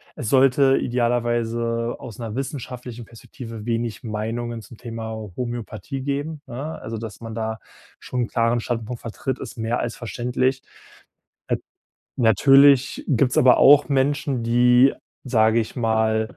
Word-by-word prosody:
es 110 - -4
sollte 135 0 +4
idealerweise 120 -1 -1
aus 115 -6 -9
'ner 115 -3 -5
wissenschaftlichen 125 -3 -6
Perspektive 115 -1 -10
wenig 115 -3 -2
Meinungen 115 +1 -4
zum 115 - -14
Thema 115 -2 -6 0.3
Homöopathie 120 +1 -5
geben, 145 +2 -3
ne? 140 +6 -6
Also, 115 +1 -5
dass 110 -3 -8
man 115 -1 -7
da 110 -1 -3 0.4
schon 125 - -3
'n - - -3
klaren 115 +1 +1
Standpunkt 115 0 -4
vertritt, 125 +3 -4
ist - - -8
mehr 115 +2 -1
als 120 - -3
verständlich. 125 +2 -1 0.9
Nat - - 0 0.6
Natürlich 135 +4 +5
gibt's 130 -1 +2
aber 125 -1 +6
auch 145 +1 +7
Menschen, 140 -2 0
die, 125 +3 +5 0.3
sage 110 -2 +3
ich 110 - -6
mal, 110 -2 0
120 Hz, 135 wpm, -23 LUFS, 115-130 Hz, 0.9 s, auch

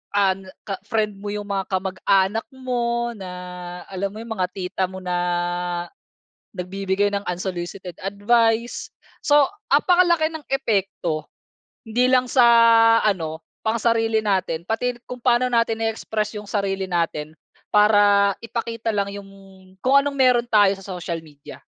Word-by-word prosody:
an 195 -1 +1 0.2
ka 195 -2 -5
friend 215 -3 -1
mo 205 - -7
yung 205 0 -3
mga 195 -2 -3
kamag-anak 190 +3 0
mo 240 -2 -1
na 180 -3 -8
alam 190 +1 -2
mo - - -8
yung 230 - -10
mga 180 - +2
tita 185 0 -4
mo 190 0 -9
na 180 - -4 1.5
nagbibigay 195 +2 -1
ng 200 - 0
unsolicited 180 0 -4
advice 225 +4 +1 0.3
so 290 -1 +5 0.2
napakalaki 340 +1 +3
ng 320 - -6
epekto 195 - -1 0.5
hindi 240 +2 +1
lang 255 -1 +2
sa 250 -3 +5 0.6
ano, 165 -6 -1 0.2
pang 220 - +2
sarili 225 -1 +2
natin 185 -5 0
pati 225 +6 -1
kung 250 0 -8
paano 245 0 +2
natin 230 -1 +1
i-express 220 -1 -2
yung 210 - -9
sarili 195 -2 -1
natin 165 -4 -2 0.4
para 205 -1 +5
ipakita 230 -1 -4
lang 200 -1 0
yung 200 0 -8 0.6
kung 270 +2 +5
anong 280 0 0
meron 250 -3 +3
tayo 205 -4 +4
sa 195 - -12
social 170 -1 -4
media. 145 -2 -13
205 Hz, 140 wpm, -22 LUFS, 190-235 Hz, 1.5 s, so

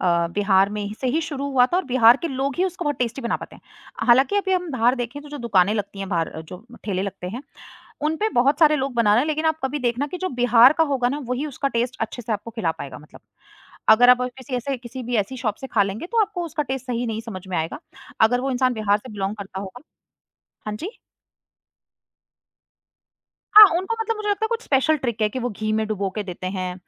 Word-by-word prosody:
अ, 170 -2 +2
बिहार 195 -1 +3
में 210 0 -4
ही 205 +1 -5
से 260 - -1
ही 315 +6 +1
शुरू 285 -4 -4
हुआ 250 -2 +4
था - - +3
और 375 - 0
बिहार 245 -2 +5
के 335 - -1
लोग 270 0 -2
ही 365 - +2
उसको 360 -1 -4
बहुत 290 -1 -1
टेस्टी 245 +1 -2
बना 235 - 0
पाते - - -11
हैं। - - -22 0.4
हालाँकि 265 +11 +4
अभी 390 -2 0
हम 360 -2 -1
बाहर 245 -2 +2
देखें 245 +2 -5
तो 295 - -12
जो 290 0 -7
दुकानें 210 -5 +2
लगती 200 -2 -4
हैं 195 -1 -5
बाहर, 170 -4 -1
जो 180 +6 -11 0.2
ठेले 190 -3 -1
लगते 195 -2 -5
हैं, 240 +8 -6 0.6
उन 305 +2 0
पे 430 +6 0
बहुत 275 +4 +2
सारे 305 -2 +5
लोग 270 -2 -3
बना 230 -3 +3
रहे 230 - +4
हैं, - - -2
लेकिन 310 +1 -1
आप 315 0 +1
कभी 275 +3 -1
देखना 250 +1 -1
कि 360 +5 -7
जो 370 - -2
बिहार 245 +2 +7
का 325 - +5
होगा 250 -3 +1
ना 280 +3 -3
वही 250 +4 -2
उसका 280 -1 -2
टेस्ट 245 +2 -1
अच्छे 225 +2 -4
से 225 - -3
आपको 215 +2 -4
खिला 220 -8 -1
पाएगा 140 - -7
मतलब, 150 +1 -16 0.7
अगर 245 +3 +7
आप 250 0 +4
अ, - - 0
किसी 260 0 -5
ऐसे 270 +3 -3
किसी 250 +2 -8
भी 240 0 -2
ऐसी 215 +5 -1
शॉप 225 -5 -2
से 265 - -5
खा 220 -5 +2
लेंगे 200 - -4
तो 460 +3 +1
आपको 360 -3 -3
उसका 320 -2 -2
टेस्ट 265 -2 -5
सही 245 -1 -2
नहीं 220 0 -3
समझ 200 -5 -8
में 185 - -2
आएगा, 160 - -3 0.4
अगर 245 +3 +4
वो 270 +1 -2
इंसान 255 0 +1
बिहार 210 -2 +1
से 220 +2 -12
बिलॉन्ग 200 0 -3
करता 195 -2 -7
होगा 200 +6 -9 0.9
हाँ 210 - -3
जी। 375 - -7 2.5
हाँ, 425 0 +12
उनका 380 +5 -2
मतलब 450 0 -1
मुझे 425 0 -4
लगता 410 +1 0
है - - 0
कुछ 465 0 -2
स्पेशल 290 - +2
ट्रिक 235 -5 -3
है 210 - +3
कि 255 - -5
वो 245 - -2
घी 215 +1 -3
में 220 0 0
डुबो 200 -2 -2
के 210 - -2
देते 185 -1 -7
हैं 185 -2 -4
245 Hz, 250 wpm, -22 LUFS, 210-290 Hz, 2.5 s, हाँ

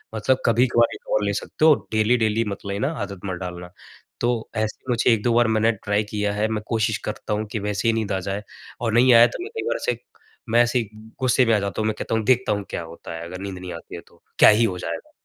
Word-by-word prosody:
मतलब 130 +4 +1
कभी-कभार 120 0 +3
एक - - -15
और 105 - +1
ले 100 - 0
सकते 155 - -1
हो, 160 - +8 0.2
डेली-डेली 110 0 +2
मत 100 - -12
लेना, 100 +9 -1
आदत 100 -2 -5
मत 95 -2 -4
डालना। 90 -1 -7 0.5
तो 120 -2 0
ऐसे 110 -1 -2
मुझे 120 0 +3
1-2 115 +2 +1
बार 120 0 +4
मैंने 110 +1 +3
ट्राई 105 +1 +1
किया 105 -1 -1
है 105 +1 0
मैं 110 -1 -3
कोशिश 110 -2 0
करता 105 0 -4
हूँ 105 +1 -1
कि 110 - -2
वैसे 105 +1 -2
ही 115 - +4
नींद 110 -3 -2
आ 95 - 0
जाए 100 +2 -3 0.4
और 115 -2 -1
नहीं 125 +2 +6
आया 115 +1 +8
तो - - -6
मैं 405 - -7
कई 445 - -3
बार - - 0
ऐसे - - -1 0.5
मैं 120 +2 +5
ऐसे 120 +1 +1
ही 110 -4 -4 0.3
गुस्से 130 0 +3
में 115 - +3
आ - - +2
जाता 100 +2 -3
हूँ, 110 - 0
मैं 110 - +1
कहता - - -2
हूँ 110 - 0
देखता 130 0 +3
हूँ 100 -1 -1
क्या - - -4
होता 85 0 -10
है 80 - -6
अगर 90 +2 -8
नींद 100 -1 -5
नहीं 90 0 -7
आती 85 - -9
है - - -7
तो। - - -24 0.2
क्या - - +9
ही 110 +2 +4
हो 95 -5 -2
जाएगा? 85 -1 -6
110 Hz, 260 wpm, -23 LUFS, 100-120 Hz, 0.5 s, क्या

